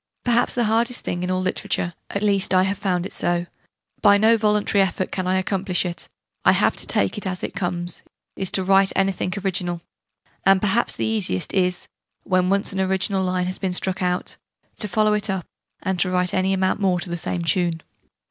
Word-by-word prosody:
Perhaps 240 0 +2
the 240 - +2
hardest 230 +2 +1
thing 175 - -2
in 180 - -2
all 185 0 0
literature 175 -1 -1 0.2
at 200 - -3
least 195 -2 +2
I 185 - +5
have 195 +1 -2
found 185 -3 -1
it - - -6
so: 175 0 0 0.6
by 205 0 +6
no 220 +2 +5
voluntary 210 -2 +2
effort 185 -1 -1
can 185 -1 -3
I 185 +1 +2
accomplish 190 -1 -1
it: 175 -1 -5 0.3
I - - +6
have - - +2
to - - -2
take 100 - +1
it 200 - -2
as 185 -1 -4
it - - -3
come's 175 -1 -2 0.3
is 190 - -2
to 190 - +1
write 195 +1 +4
anything 195 -1 0
original. 175 -2 -1 0.6
And 195 0 +5
perhaps 210 +4 +2
the - - -2
easiest 205 - 0
is, 180 -2 0 0.4
when 185 0 +1
once 200 0 +1
an 190 - -3
original 190 0 +1
line 180 -1 0
has 185 +1 -4
been 190 -2 -2
struck 185 +1 -1
out, 180 0 -1 0.4
to 210 - +2
follow 215 +2 +2
it 210 0 -1
up, 190 -3 -2 0.4
and 190 -1 -1
to 185 - +4
write 180 0 0
any 190 0 +1
amount 190 0 +1
more 185 -3 +1
to 175 - -5
the - - -1
same 170 0 -3
tune. 170 -2 +1
190 Hz, 205 wpm, -22 LUFS, 180-200 Hz, 0.6 s, by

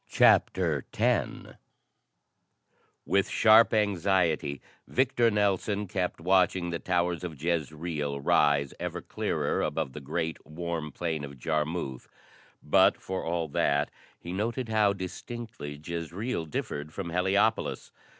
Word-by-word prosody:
CHAPTER 80 -7 +3
X - - +2 1.8
With 100 -1 +2
sharp 110 +1 +6
anxiety, 90 - +1 0.3
Victor 120 -2 +2
Nelson 105 0 +1
kept 90 -1 -2
watching 90 0 +2
the 85 - -2
towers 90 -1 0
of 80 -6 -6
Jezreel 75 -2 -2
rise 70 0 +3
ever - - -4
clearer - - -1
above 65 - -2
the 75 - -6
great, 80 +4 -3
warm 80 -1 -4
plain 80 -4 -3
of 70 -1 -8
Jarmuth, 75 -1 -2 0.6
but, - - +4
for 95 0 -4
all 85 -1 -1
that, 70 +1 +1 0.3
he 85 - -7
noted 115 +5 -2
how 105 -2 +3
distinctly 100 - -7
Jezreel 85 +3 -3
differed 75 0 -4
from 85 -1 -5
Heliopolis. 95 +5 +1
85 Hz, 115 wpm, -28 LUFS, 75-100 Hz, 1.8 s, sharp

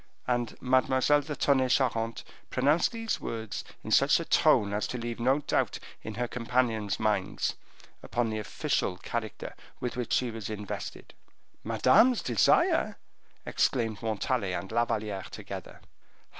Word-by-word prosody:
And 120 -2 -1
Mademoiselle 130 +3 +3
de 150 +1 -5
Tonnay 130 -3 +2
Charente 115 -3 +1 0.3
pronounced 145 +6 +2
these 225 -1 -3
words 110 -2 -4 0.2
in - - -6
such - - +5
a - - -4
tone 100 -1 +4
as 105 - -1
to 125 - -4
leave 120 -1 -4
no 130 +5 +2
doubt, - - 0 0.2
in 110 - -7
her 120 0 -1
companion's 115 -4 0
minds, 105 -3 0 0.5
upon 115 0 -1
the 110 - -2
official 95 -3 -1
character 110 +2 -5 0.3
with 125 - -3
which 125 -1 -2
she 125 -2 +1
was 110 -3 -6
invested. 105 -2 -6 0.5
"Madame's 225 - +4
desire!" 115 -6 +3 0.5
exclaimed 115 -4 0
Montalais 110 -2 -1
and 95 +2 -4
La 120 +1 +2
Valliere 105 -4 -3
together. - - -8
120 Hz, 140 wpm, -29 LUFS, 110-130 Hz, 0.5 s, such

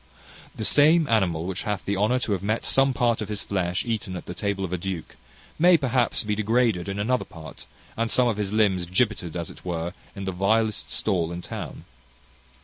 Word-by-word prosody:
The 110 - -3
same 155 +5 +5
animal 90 -8 +1
which 95 0 -3
hath 105 -3 -3
the 100 - 0
honour 105 +6 +2
to 115 - -2
have 100 +3 -1
some 135 0 +3
part 120 -2 +1
of 105 - -4
his 105 -1 -4
flesh 90 -2 -1
eaten 110 -5 -3
at 90 - -7
the - - -6
table 100 +1 -2
of 90 - -5
a - - 0
duke, 90 -2 -5 0.4
may 175 +1 +7
perhaps 130 -4 +1
be 105 -1 -1
degraded 110 -3 +1
in 100 - -3
another 125 +5 +1
part, 80 -2 -12 0.3
and 115 0 -1
some 125 +1 +4
of 115 -3 0
his 100 -2 -2
limbs 100 -5 +2
gibbeted, 90 -3 0
as 85 -1 -4
it - - -15
were, 85 -1 -3 0.2
in 100 - -6
the 95 - -2
vilest 110 +4 +1
stall 85 -6 0
in 85 0 -6
town. - - -7
100 Hz, 205 wpm, -25 LUFS, 90-115 Hz, 0.4 s, may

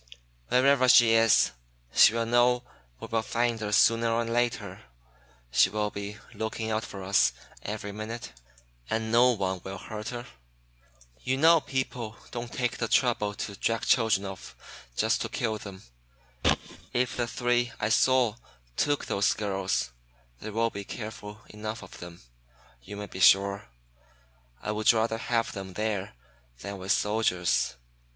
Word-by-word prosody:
Wherever 130 0 +4
she 120 -2 +7
is, 115 -1 +5 0.4
she 110 - +7
will 115 0 0
know 120 +1 +3 0.4
we - - -7
will 115 0 -1
find 115 +1 -1
her 105 -1 -3
sooner 115 +2 +4
or 115 +1 +1
later. 115 -5 -1 0.7
She 95 - +5
will 105 +1 -2
be 100 +1 -6 0.2
looking 110 0 -3
out 110 +1 -1
for 95 -1 -8
us 95 +2 +3 0.3
every 105 - -5
minute. 110 - -7 0.6
And 110 0 -1
no 120 +2 +6
one 95 -4 -2
will 95 0 -6
hurt 105 +3 -7
her. 120 -1 -6 0.9
You 130 +1 -1
know 165 +2 +6
people 125 -5 -3 0.2
don't 120 -1 -5
take 125 -1 -2
the 115 - 0
trouble 110 -4 +1
to 100 - -5
drag 115 +3 -1
children 110 -5 +3
off 95 -1 -8 0.4
just - - +1
to - - -3
kill 110 -2 -2
them. 95 -2 -10 1.1
If 125 0 0
the 120 -1 -1
three 120 0 0
I 105 - 0
saw 120 -1 +3 0.4
took 145 - 0
those 100 +1 +1
girls, 95 - -2 0.5
they 110 - -7
will 115 +2 0
be 100 - -6
careful 105 0 -8
enough 110 +1 -6
of 95 - -12
them, 90 -1 -11 0.6
you 100 - -9
may 105 - -5
be 95 - -9
sure. 100 +2 +4 1.0
I - - -2
would 110 +3 +3
rather 115 0 0
have 115 -1 0
them 95 -1 -7
there 105 - -3 0.5
than 100 -1 -6
with 95 +1 -2
soldiers. 90 - +1
110 Hz, 150 wpm, -28 LUFS, 100-120 Hz, 1.1 s, she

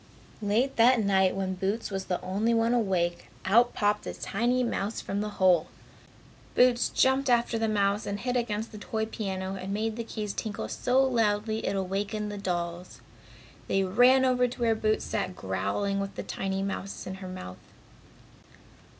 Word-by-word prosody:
Late 220 +6 +1
that 240 +2 +6
night 190 -3 +3
when 190 -1 -2
Boots 195 +5 -2
was 195 -1 -3
the 180 - -1
only 205 +6 +1
one 230 +1 +2
awake, 180 -7 0 0.2
out 235 +5 +4
popped 205 -2 +1
a - - -4
tiny 240 +5 0
mouse 220 -2 -2
from 200 +1 -3
the 210 - -2
hole. 180 -4 +4 0.9
Boots 245 -1 +4
jumped 265 +1 +2
after 235 -1 +2
the 225 - +1
mouse, 205 -1 +1
and 200 0 -3
hit 250 +3 -2
against 225 -2 -1
the 210 - -9
toy 220 +1 -2
piano 190 -3 -4
and 190 0 -5
made 220 +2 -2
the 235 - -2
keys 210 -3 -4
tinkle 215 -3 -4
so 250 +2 +1
loudly 220 -3 +1
it - - 0
awakened 200 +2 -2
the 205 - -6
dolls. 175 -2 -4 0.7
They 195 - +2
ran 245 +7 +5
over 250 -1 +3
to 245 +1 -9
where 230 -1 +3
Boots 215 0 0
sat 185 - -2
growling 100 - -1
with 195 0 -4
the - - -4
tiny 195 0 -3
mouse 195 0 -4
in 185 - -5
her 185 - -6
mouth. 135 - -8
205 Hz, 175 wpm, -28 LUFS, 190-230 Hz, 0.9 s, that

